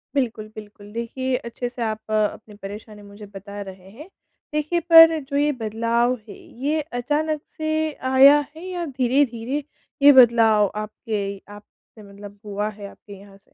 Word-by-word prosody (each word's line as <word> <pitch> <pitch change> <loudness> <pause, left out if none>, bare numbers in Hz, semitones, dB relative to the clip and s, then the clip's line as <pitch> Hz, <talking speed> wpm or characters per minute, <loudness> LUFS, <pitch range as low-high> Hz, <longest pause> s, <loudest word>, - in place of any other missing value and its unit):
बिल्कुल, 230 -5 -2
बिल्कुल 205 -1 -12
देखिए 255 +3 -3
अच्छे 245 +1 -5
से 245 0 -10
आप 220 0 -5
अपनी 215 0 -2
परेशानी 210 +1 -9
मुझे 205 +1 -13
बता 200 +1 -8
रहे 190 0 -14
हैं। 300 - -13 0.4
देखिए 305 +3 -1
पर 325 -1 +9
जो 280 - -1
ये 295 +1 +2
बदलाव 230 +3 0
है - - -9 0.3
ये 305 +2 0 0.2
अचानक 300 +4 -1 0.2
से 315 0 -1 0.2
आया 275 +2 +7 0.2
है 340 +3 -10
या 360 -2 -4
धीरे-धीरे 260 -1 -1 0.4
ये 285 +1 +9
बदलाव 225 -3 +3
आपके 215 +1 -5 0.3
आपसे 210 +1 -17
मतलब 200 0 -12
हुआ 205 +1 -3
है 205 -1 -10
आपके 205 - -15
यहाँ 200 0 -16
से? - - -30
230 Hz, 155 wpm, -22 LUFS, 210-285 Hz, 0.4 s, पर